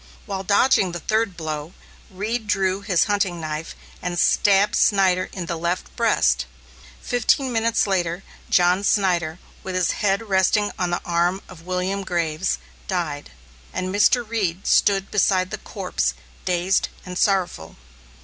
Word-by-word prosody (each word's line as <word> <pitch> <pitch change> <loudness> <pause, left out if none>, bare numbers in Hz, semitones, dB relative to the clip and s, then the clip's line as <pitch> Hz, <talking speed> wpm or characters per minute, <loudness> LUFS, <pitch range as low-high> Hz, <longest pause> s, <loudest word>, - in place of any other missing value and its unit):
While 195 -3 -4
dodging 200 -2 +3
the 175 - -4
third 215 +1 0
blow, 155 0 -5 0.4
Reed 215 +4 -3
drew 195 -1 +1
his 200 -4 +2
hunting 200 -4 0
knife 155 0 -5 0.3
and 175 -1 -3
stabbed 200 +3 +3
Snyder 190 -3 +3
in 180 -3 -5
the 170 -1 -3
left 170 +2 -3
breast. 230 -2 +2 0.6
Fifteen 250 +2 +1
minutes 230 -1 +1
later, 180 -2 -1 0.3
John 180 +2 +3
Snyder, 175 -6 +1 0.2
with 185 -1 -5
his 180 -2 +2
head 200 +2 0
resting 200 +2 +2
on 180 -1 0
the 175 - -1
arm 175 +2 0
of 175 -2 -14
William 185 +2 -1
Graves, 170 -1 -1 0.3
died, 165 -6 -3 0.4
and 185 0 -3
Mr. 225 +3 +3
Reed 195 -5 -2
stood 195 -1 +3
beside 185 -2 +2
the - - -4
corpse, 60 +1 -2 0.3
dazed 180 +1 +1 0.2
and 180 -1 -7
sorrowful. 180 - 0
185 Hz, 140 wpm, -22 LUFS, 175-200 Hz, 0.6 s, dodging